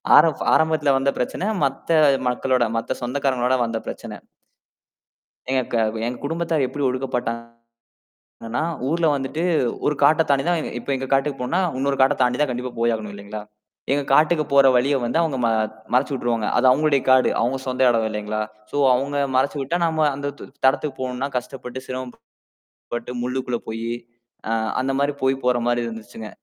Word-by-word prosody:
ஆரம் - - +5
ஆரம்பத்துல 155 -3 +3
வந்த 135 +1 +1
பிரச்சனை. 180 +10 -2 0.2
மத்த 135 +4 -2 0.4
மக்களோட 125 0 +1
மத்த 115 - -3
சொந்தக்காரங்களோட 130 0 0
வந்த 115 -1 -2
பிரச்சனை. - - -6 1.3
எங்க 130 -1 +2
க - - +2 0.3
எங்க 125 0 -4
குடும்பத்தார் 165 -2 0
எப்பிடி 145 +2 -4
ஒடுக்கப்பட்டாங்கன்னா 115 -2 -4 1.2
ஊர்ல 165 +2 +1
வந்துட்டு 140 +4 -2 0.4
ஒரு 150 - +3
காட்டைத் 155 +1 +4
தாண்டிதான் 160 +4 +1
இப்ப - - -10
எங்க 135 0 -3
காட்டுக்குப் 135 -1 0
போணுன்னா, 170 +9 0 0.2
இன்னொரு 135 0 0
காட்டத் 130 0 +3
தாண்டி 125 0 +1
தான் 145 - +2
கண்டிப்பா 125 0 -4
போயாகணும். 110 -3 0
இல்லீங்களா? 100 +1 -7 0.5
எங்க 145 0 +1
காட்டுக்குப் 155 -1 +3
போற 140 -1 +7
வழிய 140 +3 +2
வந்து 120 +8 0
அவங்க 155 -5 -1
ம - - +3 0.4
மறச்சு 130 +3 +2
விட்டுருவாங்க. 115 -4 -1
அது 125 - +3
அவுங்களுடைய 140 0 +3
காடு. 130 0 +5
அவுங்க 125 +3 0
சொந்த 130 0 -2
இடம், 115 -2 +2
இல்லேங்களா! 105 0 -3 0.3
ஸோ - - -3 0.2
அவுங்க 140 +3 -1 0.2
மறச்சு 140 +3 +1
விட்டா, 165 +6 -1
நாம 155 -2 +2
அந்தத்து 140 0 -6 0.2
இடத்துக்குப் 135 0 +1
போணுன்னா, 130 +2 -3
கஷ்டப்பட்டு, 125 0 -6
சிரமப்பட்டு 130 -1 -8 0.9
முள்ளுக்குள்ள 125 -1 -2
போயி, 115 +1 -4 0.6
அ - - -1 0.3
அந்தமாரி 140 +2 0
போய் 135 0 +1
போறமாரி 120 -1 +1
இருந்துச்சுங்க. 110 -1 -8
130 Hz, 150 wpm, -22 LUFS, 120-145 Hz, 1.3 s, போற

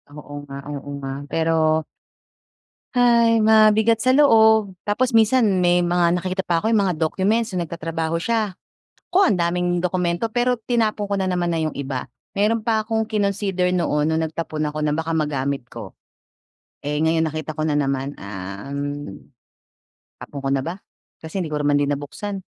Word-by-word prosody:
Oo 150 -1 -10
nga, 140 0 -8
oo 145 0 -7
nga. 135 0 -3
Pero, 160 0 +1 1.1
"Hay! 235 -2 +4
Mabigat 220 +1 +5
sa 255 +3 +2
loob." 220 -8 +5
Tapos 240 +5 +1
minsan 225 -3 +3
may 175 0 +3
mga 175 0 +2
nakikita 185 +1 -2
pa 165 -1 +1
ako 220 - +1
yung 220 -3 +3
mga 180 - 0
documents 200 +8 +1
nung 175 -2 -2
nagtatrabaho 165 0 -3
siya. 220 -3 0 0.6
Naku, - - +4
ang 205 - +3
daming 175 +1 0
dokumento 180 +3 0
pero 245 0 +1
tinapon 220 -2 0
ko 200 - -1
na 190 -1 -1
naman 175 -1 0
na 165 - 0
yung 155 -1 -2
iba. 135 -2 -4 0.3
Mayro'n 220 +3 +2
pa 220 -1 +2
akong 220 0 0
kinonsider 200 -3 0
noon 155 -4 +1
nung 160 - +1
nagtapon 155 -1 -4
ako 150 +1 -5
na 150 -1 +1
baka 160 +1 -2
magamit 140 -4 -1
ko. 110 -5 -9 0.9
Eh, 150 +1 -1
ngayon 160 0 +2
nakita 155 0 -4
ko 155 - -1
na 150 - 0
naman, 140 -1 -1
um. 105 +7 -6 0.9
Tapon 140 - -8
ko 135 - 0
na 135 -1 +1
ba? 170 +5 -4 0.5
Kasi 160 +4 -5
hindi 160 - -5
ko 150 - -1
naman 145 0 +1
din 145 0 0
nabuksan. 190 +8 -5
175 Hz, 170 wpm, -22 LUFS, 150-215 Hz, 1.1 s, Mabigat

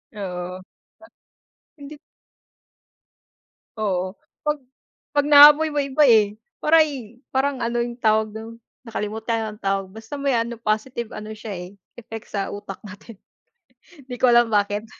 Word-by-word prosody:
Oo. 180 -2 -5 1.2
Hindi 290 +1 -11 1.8
Oo, 190 -3 -2 0.3
'pag 300 0 0 0.6
'pag 290 -1 +2
naamoy 295 +2 +8
mo 295 -1 -1
iba 280 +2 +2
eh, 210 -3 +5 0.3
para'y 285 -8 +2
parang 270 -1 0
ano 235 +1 -1
yung 240 0 -6
tawag 215 -1 +2
dun, 225 +1 -8 0.3
nakalimutan 220 0 -3
anong 210 - -17
tawag, 195 0 0
basta 220 +5 -11
may 280 -2 0
ano 235 +1 -2
positive 225 +1 -2
ano 215 0 -7
siya 215 -1 -7
eh, 180 -1 -7 0.3
effect 225 -1 -9
sa 200 -1 -2
utak 205 -1 -8
natin. 205 +2 -12 0.9
'Di 250 - -6
ko 255 - +4
alam 240 0 +5
bakit. 205 +1 +1
225 Hz, 130 wpm, -22 LUFS, 205-265 Hz, 1.8 s, naamoy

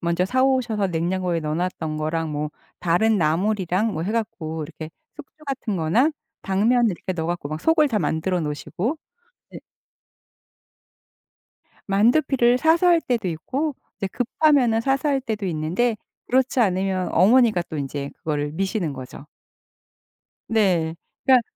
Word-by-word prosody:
먼저 170 +1 +1
사 255 +7 +1
오셔서 240 -7 +1
냉장고에 175 +1 -1
넣어 155 0 -2
놨던 165 -3 -2
거랑 155 0 -2
뭐 150 0 -3 0.3
다른 210 +6 +2
나물이랑 190 +4 +1
뭐 160 - -3
해 185 - -2
갖고 160 -8 -3
이렇게 155 +1 -9 0.3
숙주 300 +1 -14
같은 260 -7 -3
거나 180 - +2 0.3
당면을 225 +5 +2
이렇게 185 +1 -4
넣어 165 -3 -3
갖고 160 -3 -3
속을 320 - +3
다 220 - 0
만들어 175 +3 0
놓으시고. 175 - -3 0.5
네 - - -9 2.3
만두피를 240 +4 +3
사서 325 +5 +3
할 340 -1 +5
때도 235 - -1
있고 265 - -2 0.2
이제 195 - -3
급하면은 250 0 +2
사서 270 +4 0
할 275 -2 +1
때도 220 -5 -3
있는데 180 +8 0 0.3
그렇지 260 +1 +2
않으면 190 -3 +1
어머니가 215 0 +4
또 155 - -4
인제 140 0 -4
그거를 150 -1 -2
미시는 190 -1 -1
거죠. 135 +2 -10 1.2
네. 180 -8 +1 0.3
그러니까 255 -2 +6
195 Hz, 300 characters per minute, -23 LUFS, 165-245 Hz, 2.3 s, 그러니까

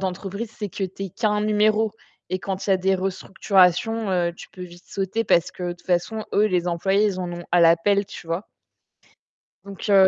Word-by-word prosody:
d'entreprise, 195 +4 -4
c'est 210 -1 -4
que 195 - -6
tu 190 +1 -6
es 190 - -6
qu'un 210 0 0
numéro. 215 0 +2 0.4
Et 185 0 -2
quand 195 -1 -4
il - - 0
y - - +7
a - - +5
des 190 +1 +1
restructurations, 195 +3 +1
heu, 175 -2 +1
tu - - -11
peux 185 - -10
vite 175 0 -11
sauter, 195 +4 -1
parce 170 -6 +2
que 180 - -9
de 175 0 -1
toute 175 - -17
façon, 190 +5 0
eux, 210 +1 +4
les 180 -4 0
employés, 190 +4 +2
ils 190 -3 -2
en 180 -1 -3
ont 175 0 -7
à 175 - +5
la 165 0 +7
pelle, 200 +4 +2
tu 175 - -11
vois? 170 +5 -3 1.2
Donc 200 +2 -7
heu, 195 -1 +7
190 Hz, 220 wpm, -23 LUFS, 180-210 Hz, 1.2 s, y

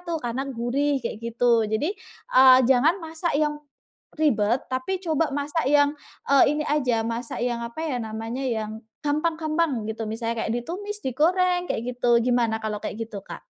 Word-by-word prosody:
tuh 340 -2 -3
karena 255 +3 -3
gurih 270 +4 0
kayak 220 - -4
gitu. 230 -1 +2
Jadi, 290 - 0 0.4
eee, 255 0 +8
jangan 270 +8 +4
masak 320 -1 -2
yang 300 0 0 0.6
ribet, 240 -6 +2
tapi 260 +9 -1
coba 320 -1 +1
masak 290 0 -1
yang, 290 0 +4 0.4
eee, 280 - +7
ini 300 - -1
aja 250 -7 +1
masak 230 +1 -4
yang 240 -1 -1
apa 235 +7 -7
ya 280 -6 -1
namanya, 225 +4 -4
yang 220 -1 -3 0.2
gampang-gampang 310 -4 0
gitu. 220 0 -4
Misalnya 230 +1 -3
kayak 220 - -1
ditumis, 400 - -5
digoreng, 355 +7 +2
kayak - - -1
gitu. 240 -1 +3
Gimana 240 -3 +2
kalau 210 -1 -3
kayak - - -5
gitu, 200 -3 -7
Kak? - - -10
260 Hz, 165 wpm, -25 LUFS, 230-310 Hz, 0.6 s, eee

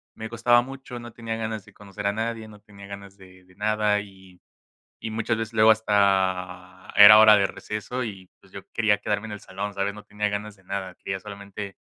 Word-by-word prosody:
me 110 0 -7
costaba 120 +1 +3
mucho, 130 -1 -9
no 120 0 -10
tenía 115 -1 -5
ganas 110 -2 -4
de 105 - -18
conocer 100 0 -9
a 100 - +1
nadie, 110 0 -4
no 105 -1 -14
tenía 100 -1 -14
ganas 100 0 -10
de 95 -1 -17
de 90 0 -23
nada 105 0 +1
y 95 -2 -16 0.6
y 110 - -5
muchas 115 +1 -1
veces 115 0 -5
luego 110 0 +5
hasta 95 -3 0
era 105 +1 +10
hora 110 -1 +8
de 100 - +2
receso 115 +6 -5
y, 95 -4 -9
pues - - -23
yo - - -8
quería 110 -3 +2
quedarme 105 +1 -2
en 105 - -7
el 105 - -7
salón, 100 0 -6
¿sabes? 100 +1 -1
No 105 - -12
tenía 105 0 -2
ganas 105 0 -5
de 95 - -25
nada, 95 -1 -5
quería 95 0 -5
solamente, 100 0 -9
105 Hz, 210 wpm, -25 LUFS, 100-110 Hz, 0.6 s, era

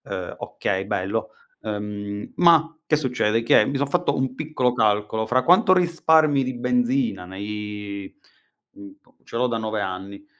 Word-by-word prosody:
Ehm, - - -5
okay, - - -3
bello. - - -2 0.3
Ehm, 105 0 -5
ma, 165 -1 +4
che 150 - +3
succede, 120 -6 0
che 110 -2 +5
mi 140 - -2
son 140 +1 0
fatto - - 0
un 130 -1 -1
piccolo 150 -5 -1
calcolo, 110 -1 0
fra 130 +1 +2
quanto 185 - +5
risparmi 160 -5 +3
di 130 0 -4
benzina 245 - 0
nei, 105 +1 -6 0.6
uhm, 300 -1 -13
co 245 0 -30
ce - - -12
l'ho 125 - +2
da 120 -2 -1
9 110 -1 -3
anni, 95 +6 -6
125 Hz, 155 wpm, -23 LUFS, 105-160 Hz, 0.6 s, che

